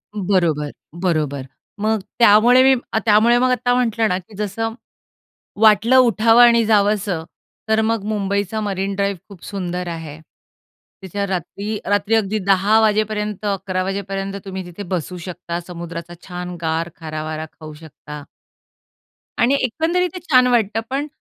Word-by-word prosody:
बरोबर, 175 -7 0 0.3
बरोबर. 150 -6 -1 0.3
मग 220 +1 +1 0.2
त्यामुळे 235 +3 +6
मी 265 0 +6 0.3
त्यामुळे 225 +3 +5
मग 255 0 +2
आत्ता 245 0 +1
म्हटलं 230 -3 +1
ना 180 - 0
की 190 +3 -12
जसं 215 +2 -3 0.9
वाटलं 220 +4 +5
उठावं 230 -1 +5
आणि 235 -1 +5
जावसं 205 -5 +1 0.5
तर 220 0 +3
मग 220 -2 0
मुंबईचा 205 0 -1
मरीन 195 -1 -2
ड्राइव्ह 200 -2 -1
खूप 190 -4 -14
सुंदर 180 -2 -4
आहे. 160 -3 -7 0.8
तिथे 200 +2 -3
रात्री 200 +3 -4
रात्री 205 +2 +1
अगदी 215 0 0
10 200 +3 +4
वाजेपर्यंत, 210 -1 0
11 190 -2 -1
वाजेपर्यंत 195 0 -4
तुम्ही 190 -1 -6
तिथे 175 +3 -8
बसू 180 +1 -3
शकता. 175 -1 -5
समुद्राचा 170 -1 -7
छान 180 0 -6
गार 165 +1 -1
खारा 155 -1 -5
वारा 155 0 -4
खाऊ 155 -1 -11
शकता. 150 -1 -10 1.2
आणि 260 +4 +4
एकंदरीत 335 +8 0
ते - - -4
छान 260 -7 +4
वाटतं. 225 -3 +1
पण 280 +3 -2
200 Hz, 140 wpm, -20 LUFS, 180-220 Hz, 1.2 s, त्यामुळे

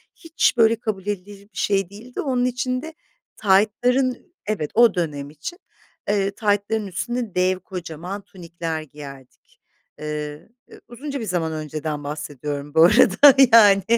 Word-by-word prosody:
hiç, 330 -7 0
böyle, 225 0 +5
kabul 210 -4 -5
edilir 200 0 -5
bir - - -15
şey 195 -3 +1
değildi. 230 +5 -8
Onun 255 -4 0
için 255 0 -1
de 320 0 -8 0.4
taytların 245 - +1
Evet, 190 -9 -2
o 235 -2 +5
dönem 145 -5 -3
için. 160 - -8 0.5
Eee, 200 -1 +1
taytların 205 0 -1
üstüne 225 +3 -4
dev 185 0 +2
kocaman 180 +1 -7
tunikler 170 -4 -6
giyerdik. 140 -3 -13 0.4
Iıı, 150 +3 -6 0.2
ı - - -14
uzunca 275 +3 -6
bir 225 - -4
zaman 170 -4 -1
önceden 155 -1 -4
bahsediyorum 145 0 -5
bu 160 - +6
arada, 235 +10 +7 0.2
yani. 205 -4 +7
195 Hz, 135 wpm, -22 LUFS, 155-230 Hz, 0.5 s, arada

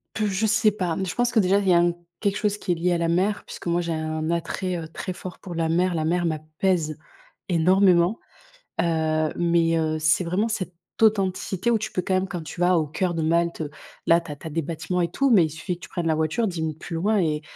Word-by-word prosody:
Pff 215 -1 0
je 195 +3 0
sais 220 0 +3
pas, 180 -5 -2
mais 190 - -1
je 180 - -4
pense 245 0 +1
que 230 - +3
déjà, 195 0 +3
il 200 - -2
y - - +6
a - - +6
un 175 0 +3 0.3
quelque 200 -2 0
chose 210 -1 0
qui 190 -3 -1
est - - -2
lié 175 +2 0
à 175 - +2
la 170 0 0
mer, 190 +5 +1
puisque - - -9
moi, 170 +1 +1
j'ai 170 -1 -2
un 155 0 -2
attrait, 170 +2 -2
heu, 160 -1 -6
très 185 +3 -5
fort 180 0 -9
pour 180 -3 -8
la 165 -1 0
mer. 175 +2 +2
La 160 - 0
mer 175 +2 +1
m'apaise 155 0 -1 0.5
énormément, 180 +2 +4 0.6
heu, 160 -2 +1
mais 170 -1 +2
heu, 155 -1 0
c'est 155 +3 +3
vraiment 180 +6 0
cette 195 -5 -3 0.3
authenticité 195 -1 +2
où 230 - +4
tu 220 - -4
peux 180 - -1
quand 190 - -1
même 185 +1 +1
quand 175 -3 -5
tu 170 - -7
vas 180 0 +4
au 160 - +1
cœur 175 +4 -1
de 165 - -1
Malte, 170 0 +1 0.4
là, 170 +1 +5
tu 165 - -9
as - - -5
tu 160 - -9
as - - -5
des 165 +2 -1
bâtiments 170 +3 -2
et 170 -1 -1
tout, 275 +7 +1
mais 190 -8 +6
il 155 - -3
suffit 170 +4 -4
que 175 - -18
tu - - -17
prennes 175 -2 -2
la 160 - +2
voiture, 160 +9 0
10 175 -4 -3
minutes 160 -1 -3
plus 165 - -6
loin 205 +6 +1
et 155 -4 0
175 Hz, 265 wpm, -24 LUFS, 160-190 Hz, 0.6 s, y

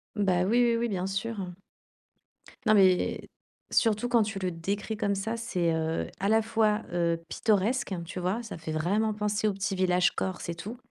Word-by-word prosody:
Bah, 185 -3 +2
oui, 235 +5 +3
oui, 235 -1 +3
oui, 235 0 0
bien 185 -2 -2
sûr, 200 +3 -3
heu. 180 -2 -5 1.1
Non, 215 - +5
mais 190 -3 +3 0.4
surtout 225 +1 +2
quand 235 -3 +4
tu 210 -1 -4
le 185 -1 -1
décris 200 +6 -3
comme 205 -2 0
ça, 220 +4 -2
c'est, 180 -8 0
heu, 160 0 -1
à 200 - 0
la 220 0 +4
fois, 220 -1 +1
heu, 170 -1 0
pittoresque, 220 +1 +1
tu 180 +1 -6
vois, 190 +7 -1
ça 220 - -7
fait 160 -1 -6
vraiment 205 +7 +1
penser 210 0 0
au 205 - +1
petit 195 0 -2
village 180 -1 +3
Corse 185 -2 -4
et 170 - -2
tout. 215 +8 -7
200 Hz, 195 wpm, -28 LUFS, 180-220 Hz, 1.1 s, Non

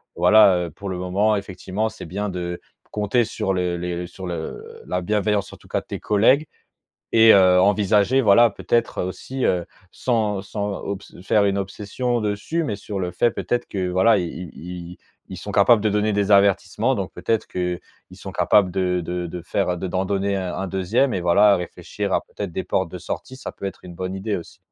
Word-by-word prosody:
voilà, 90 +2 +6
heu, 85 - -8
pour 100 +6 -7
le 95 - -3
moment, 95 +4 +1
effectivement, 100 +2 -3
c'est - - -10
bien 100 +5 -3
de 90 -1 -4 0.3
compter 105 +4 +1
sur 105 -3 -2
le 90 -1 -1
les 90 0 -4
sur 95 +1 -9
le 85 -2 -6
la 90 - -1
bienveillance, 105 +1 0
en - - -11
tout - - -20
cas, - - 0
de - - -25
tes - - -6
collègues 125 +9 +3 0.7
et 115 0 +7
heu, 90 -2 +6
envisager, 105 +5 +3
voilà, 115 0 +6
peut-être, 115 +3 -1
heu, - - -1
aussi, 130 +8 -5
heu, 90 -1 +1 0.3
sans 110 -5 0
sans 100 0 -4
obs 100 0 -6
faire 105 +2 +3
une 100 0 +1
obsession 105 +5 -2
dessus, 105 +11 -2
mais 110 -8 -2
sur 100 0 -6
le 90 -1 -2
fait, 120 - +2
peut-être, 120 - -2
que 95 -2 -2
voilà, 95 +6 +4
i 90 - -1
i 85 0 -7
i 90 0 -8
i - - -14 0.3
ils - - -7
sont - - -7
capables 115 -4 +5
de 110 - +2
donner 105 +1 +1
des 100 0 0
avertissements, 100 +4 +3
donc 100 -5 -4
peut-être 115 -1 -1
qu'ils 90 -1 -2 0.4
sont - - -8
capables 100 -3 +3
de 90 -1 0
de 90 0 -4
faire 90 0 -1
de 95 - -3
d'en 95 +1 -1
donner 100 0 0
un 95 -2 -3
un 95 - -3
2e 95 +8 +1
et 95 - -1
voilà, 100 +4 +5
réfléchir 90 -1 -5
à - - +3
peut-être 100 -4 -7
des 95 - -2
portes 95 -3 -1
de 90 - -5
sortie, 90 +8 -6
ça 135 - -6
peut - - -10
être 95 - -7
une 90 - -9
bonne 95 +1 -4
idée 100 +2 -2
aussi. 85 - -10
100 Hz, 210 wpm, -22 LUFS, 90-105 Hz, 0.7 s, et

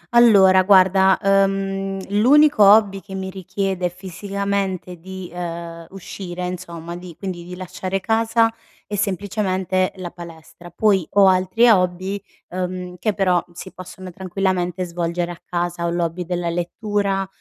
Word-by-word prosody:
Allora 195 -6 +7
guarda, 190 0 +5
uhm, 195 0 +1
l'unico 270 +5 +5
hobby 200 -1 +5
che 195 -2 -9
mi 190 0 -4
richiede 190 -1 -2
fisicamente 190 0 -4
di, 190 0 -8
ehm, 170 -1 -6
uscire 180 -1 -7
insomma, 170 -2 -6
di 175 -2 -10
quindi 185 -3 -5
di 180 +1 -8
lasciare 185 +1 -4
casa 225 +1 +2 0.3
è 205 - -5
semplicemente 190 -2 -1
la 180 -2 -7
palestra. 170 0 -12
Poi 190 -1 +1
ho 200 -1 +6
altri 185 +6 +3
hobby, 185 0 +1 0.3
uhm, 180 0 -4
che 215 0 0
però 180 -3 +2
si 180 +2 -9
possono 185 0 -10
tranquillamente 185 0 -2
svolgere 170 0 -3
a 170 - -11
casa: 175 -1 -3
ho - - 0
l'hobby 170 +1 -2
della 175 0 -2
lettura, 195 +3 -1
185 Hz, 135 wpm, -21 LUFS, 175-195 Hz, 0.3 s, Allora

